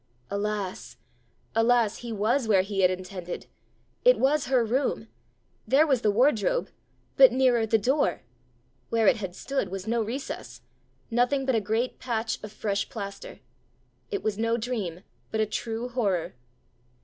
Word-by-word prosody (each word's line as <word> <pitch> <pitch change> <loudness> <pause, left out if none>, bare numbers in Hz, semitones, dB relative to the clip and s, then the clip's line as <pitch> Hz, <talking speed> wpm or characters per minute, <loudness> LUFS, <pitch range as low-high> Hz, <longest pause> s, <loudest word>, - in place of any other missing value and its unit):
Alas! 200 -2 -3 0.6
alas! 225 -1 +3
he 240 -1 -7
was 225 +4 +1
where 195 -4 +4
he 195 0 -4
had 185 -1 +5
intended! 185 -1 -5 0.6
It - - +6
was 285 +2 +2
her 255 -3 +3
room! 255 +5 -1 0.6
There 285 +4 +5
was 265 -6 +2
the 215 - +2
wardrobe, 245 - +2 0.5
but - - +9
nearer 245 -4 +3
the 225 - +4
door! 260 +8 +1 0.7
Where 225 -1 +2
it - - +5
had 190 -4 -5
stood 270 -8 -2
was 190 0 -5
no 230 +1 0
recess! 240 +6 -5 0.5
nothing 250 +4 +2
but 260 - +1
a 225 - +2
great 225 +5 -1
patch 225 -2 -2
of 215 - -7
fresh 200 -2 -2
plaster! 210 - -7 0.7
It 405 -3 -3
was 215 -1 -1
no 230 +1 +1
dream, 215 -8 -3 0.3
but 220 - -2
a 215 - +3
true 225 +2 -3
horror! 205 -9 -1
225 Hz, 150 wpm, -27 LUFS, 205-255 Hz, 0.7 s, but